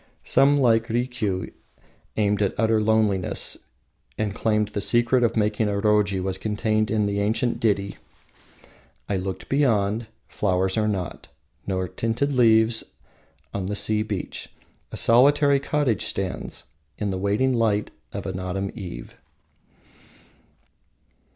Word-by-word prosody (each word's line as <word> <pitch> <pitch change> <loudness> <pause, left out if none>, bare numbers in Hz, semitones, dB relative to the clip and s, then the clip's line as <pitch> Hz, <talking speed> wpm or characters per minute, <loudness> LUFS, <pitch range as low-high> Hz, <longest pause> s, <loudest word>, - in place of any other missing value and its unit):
Some, 140 +1 +4
like 115 -3 +3
Rikiu, 115 -5 -2 0.6
aimed 105 -1 +1
at 100 - -1
utter 110 -1 +3
loneliness, 105 -3 +1 0.5
and 105 -2 -1
claimed 105 -1 0
the 105 -1 -3
secret 120 +2 +3
of 115 - +1
making 105 0 +1
a - - -1
roji 105 -2 +2
was 95 0 -3
contained 110 +1 0
in 105 -2 +1
the 100 0 -1
ancient 110 +4 0
ditty: 100 -3 0 1.1
"I 100 - 0
look 95 0 -5
beyond; 115 -5 +1 0.2
Flowers 95 -1 0
are 110 -1 +1
not, 95 -4 -4 0.4
Nor 95 -1 -1
tinted 115 +9 -1
leaves. 110 -2 +4 0.7
On 95 -2 -3
the 105 - -2
sea 105 +1 0
beach 105 -3 -5 0.4
A - - -5
solitary 140 +4 +5
cottage 140 -4 0
stands 95 -2 -4 0.3
In 105 -2 -2
the 95 - -3
waning 105 +7 +1
light 110 -3 +1 0.2
Of - - -6
an 95 -1 -4
autumn 95 +1 -3
eve." 90 - -8
105 Hz, 130 wpm, -24 LUFS, 100-115 Hz, 1.1 s, solitary